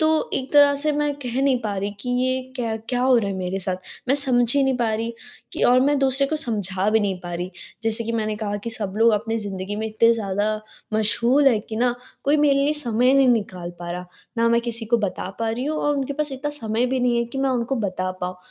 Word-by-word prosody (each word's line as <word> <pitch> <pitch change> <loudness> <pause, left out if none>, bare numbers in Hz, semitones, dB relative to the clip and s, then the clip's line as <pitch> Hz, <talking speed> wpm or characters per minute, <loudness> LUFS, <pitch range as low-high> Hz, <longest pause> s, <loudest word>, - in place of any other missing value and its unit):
तो 315 0 +2
एक 265 0 -3
तरह 285 -1 +6
से 300 +2 0
मैं 295 0 0
कह 250 +1 -2
नहीं 270 -2 +3
पा 210 -2 -2
रही 200 +1 -2
कि 250 - -4
ये 255 0 +1 0.2
क्या 230 -3 -2
क्या 245 -1 0
हो 260 -1 +5
रहा 205 - -1
है 195 - -3
मेरे 185 +1 -2
साथ? 185 -1 -2 0.3
मैं 270 - +4
समझ 245 -4 +3
ही 280 - +4
नहीं 265 -1 +1
पा 235 -3 0
रही 230 +2 -2 0.4
कि - - -3
और 250 +1 +5
मैं 285 +2 +3
दूसरे 270 0 +2
को 310 +2 -1
समझा 205 - -1
भी 220 +1 +3
नहीं 195 -3 -1
पा 175 -1 -7
रही 175 +1 -4 0.3
जैसे 225 0 +1
कि 230 - -3
मैंने 215 -2 -1
कहा 205 -1 -3
कि 230 - -3
सब 210 -4 -4
लोग 230 +1 +5
अपनी 225 +2 0
ज़िन्दगी 200 -1 -5
में 220 +1 -2
इतने 230 +2 +4
ज़्यादा 215 0 -1 0.3
मशग़ूल 235 +6 +3
हैं 225 -5 +2
कि 220 - -4
ना 240 +1 +2 0.3
कोई 290 +2 +4
मेरे 295 -1 +4
लिए 285 +2 +2
समय 245 -4 0
ही 265 - +5
नहीं 270 -1 +5
निकाल 190 -7 0
पा 175 0 -6
रहा। 180 +1 -5 0.3
ना 230 0 +4
मैं 235 0 +3
किसी 235 -1 -4
को - - +7
बता 200 -3 -3
पा 225 -1 0
रही 240 +3 -3
हूँ 305 +2 -1
और 295 0 +1
उनके 275 0 -2
पास 300 0 -2
इतना 270 +3 -3
समय 235 -4 -1
भी 260 0 -1
नहीं 245 -1 +2
है 235 - +1
कि 240 +3 -7
मैं 270 0 +1
उनको 250 +1 -1
बता 185 0 -2
पाऊँ 180 0 -3
235 Hz, 260 wpm, -23 LUFS, 210-270 Hz, 0.4 s, को